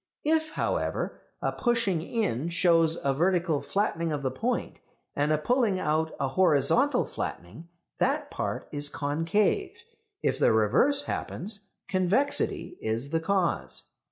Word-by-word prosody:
If, 315 0 +1
however, - - -2 0.2
a - - +1
pushing 230 -9 0
in 170 - -1
shows 165 -2 +3
a 140 - +2
vertical 170 0 +1
flattening 170 -5 -1
of 145 -2 -3
the 130 - 0
point, 235 - -2 0.4
and 145 +1 +1
a 155 - +3
pulling 225 - +1
out 160 0 0
a 135 -2 0
horizontal 190 - +3
flattening, 105 - -6 0.3
that - - 0
part - - -3
is 145 0 +1
concave; 165 - 0 0.5
if - - +1
the - - +4
reverse 130 - +3
happens, 200 -5 -4 0.2
convexity 185 -1 0
is 115 +6 -2
the 165 - +1
cause. 160 - -1
170 Hz, 130 wpm, -28 LUFS, 145-210 Hz, 0.5 s, the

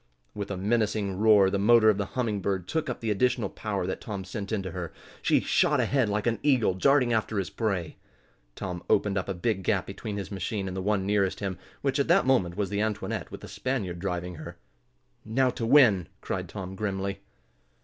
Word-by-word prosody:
With 100 -1 -5
a 100 - -3
menacing 105 -1 0
roar 105 -3 +6
the 100 - 0
motor 110 +2 +5
of 105 -2 +4
the 100 - -1
Humming 110 -5 0
Bird 95 -2 -2
took 160 +2 -1
up 125 - -4
the 115 -2 -1
additional 125 +4 +1
power 100 -4 -3
that 95 - -4
Tom 100 -3 -5
sent 100 +2 -6
into 95 -4 -2
her. 90 -1 -5 0.3
She - - +3
shot - - +2
ahead 130 -6 +2
like 105 0 -1
an 115 -3 +1
eagle 130 -9 +3
darting 125 +4 +3
after 110 -1 0
his 95 -2 -2
prey. 100 -8 -2 0.6
Tom 90 -3 -5
opened 100 -1 +2
up 100 0 -2
a 95 - -2
big 95 +2 -1
gap 95 -1 0
between 105 +1 -6
his 100 -1 -5
machine 95 +1 -3
and 95 - -5
the 95 - -2
one 100 -1 0
nearest 100 -2 +1
him, 95 -3 -4 0.2
which, 135 0 +1
at 140 - +2
that - - +4
moment, 95 -10 +2
was 100 -2 -1
the 100 0 0
Antoinette, 110 -2 -2
with - - -9
the - - -9
Spaniard 105 -10 -3
driving 90 -2 -3
her. 80 - -9 0.7
"Now 125 +4 +1
to 115 -2 -3
win!" 115 - +6
cried - - -4
Tom, 95 -2 -6
grimly. 100 -1 -3
100 Hz, 210 wpm, -27 LUFS, 95-115 Hz, 0.7 s, roar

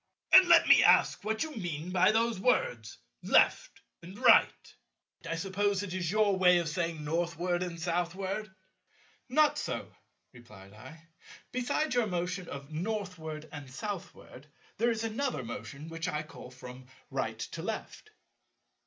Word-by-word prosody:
And 375 -1 +9
let - - +6
me - - +7
ask - - +4
what 220 +1 -1
you 315 - -6
mean 175 -3 -5
by 185 +2 +4
those 225 -1 +1
words 120 - 0 0.2
'left' - - +2 0.2
and 180 +4 -11
'right.' - - +4 0.6
I 165 - -1
suppose 200 +2 -1
it 185 -3 -6
is 180 -3 -2
your 210 0 +2
way 180 -1 +5
of 170 -2 -1
saying 165 -1 -3
Northward 170 +3 -1
and 175 -2 -4
Southward." 185 +4 -2 0.8
"Not 300 +3 +3
so," - - -5 0.4
replied 105 -5 -15
I; 130 +9 -13 0.5
"besides 255 +5 -1
your 245 -3 +2
motion 180 0 -3
of 140 +1 -8
Northward 165 -4 -5
and 145 -3 -9
Southward, 160 -4 -8 0.3
there 235 +3 +2
is 225 -1 -2
another 225 - -2
motion 140 +5 -8
which 165 0 -5
I 150 0 -2
call 155 -5 -12
from 125 0 -12 0.2
right - - -3
to - - -6
left." 430 - -6
175 Hz, 145 wpm, -30 LUFS, 155-210 Hz, 0.8 s, And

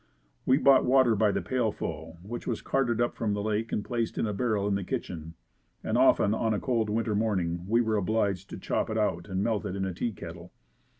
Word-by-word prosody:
We 130 - +5
bought 140 -2 +5
water 130 -3 +4
by 105 0 +3
the - - -2
pailful 105 -9 -3
which 120 +5 -6
was 120 - -2
carted 125 -4 0
up 120 0 +1
from 105 -3 -1
the 100 - -3
Lake 110 +1 -1
and 105 - -2
placed 120 -2 -2
in - - +1
a 105 - -2
barrel 105 -2 0
in 100 - +1
the 100 0 -1
kitchen 80 -2 -5 0.5
and - - -1
often 100 - +4
on 110 -1 0
a - - -1
cold 115 -4 0
winter 110 0 0
morning, 90 -5 -1
we 115 +3 +3
were 110 -2 +1
obliged 100 -2 0
to - - -7
chop - - -1
it 110 - -2
out 100 -4 0
and 95 +1 -1
melt 110 -3 0
it 95 - -4
in 95 - -2
the 95 -1 -2
tea 115 +7 -2
kettle. 85 -2 -10
105 Hz, 230 wpm, -28 LUFS, 95-115 Hz, 0.5 s, We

